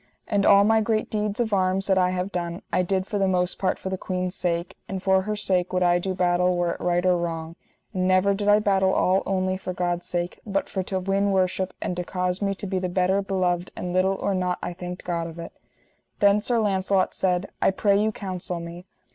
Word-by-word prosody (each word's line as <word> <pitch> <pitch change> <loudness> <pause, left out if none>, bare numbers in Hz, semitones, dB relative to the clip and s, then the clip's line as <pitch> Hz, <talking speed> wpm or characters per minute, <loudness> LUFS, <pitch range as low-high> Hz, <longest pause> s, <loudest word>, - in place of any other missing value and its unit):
And 200 -2 +2
all 200 0 +7
my 220 +1 +4
great 215 0 -1
deeds 210 0 -2
of 225 -3 0
arms 190 0 +1
that 190 -2 +3
I 180 0 +3
have 185 +2 -2
done, 170 -1 -4
I 180 - +3
did 185 +1 0
for 205 0 -3
the 195 - +2
most 180 -1 0
part 185 - 0
for 190 - -5
the 190 - -3
queen's 185 -1 -3
sake, 170 -2 -2
and 190 -1 -4
for 190 -1 +4
her 210 +2 -3
sake 185 -3 0
would 185 0 +1
I 175 0 +4
do 185 +1 -3
battle 180 0 +2
were 175 -1 +1
it - - -6
right 175 0 +1
or 180 -1 +4
wrong, 165 -1 -4 0.4
and 185 -1 0
never 185 +2 +4
did 205 +1 -3
I 205 0 +7
battle 195 -2 +2
all 190 +1 +2
only 185 -1 0
for 185 -1 -5
God's 175 -1 -2
sake, 175 0 -3
but 195 -2 -1
for 190 - -2
to 190 +1 -2
win 195 +2 +1
worship 185 0 0
and 180 - -2
to 180 - -1
cause 180 +1 -2
me 195 -1 0
to 195 - -7
be 190 -1 -1
the 185 0 -2
better 185 +2 +2
beloved 180 -2 -1
and 180 -1 -4
little 190 +1 +2
or 195 - -1
nought 180 -1 0
I 175 - -3
thanked 180 0 -7
God 170 -2 -2
of 165 0 -10
it. 170 0 -7 0.7
Then 200 +1 +4
Sir 240 +2 0
Launcelot 195 -3 +1
said: 180 0 -1
I - - +4
pray 200 +1 +2
you 215 +1 +1
counsel 185 -4 -5
me. 170 +2 -9
185 Hz, 240 wpm, -25 LUFS, 180-195 Hz, 0.7 s, all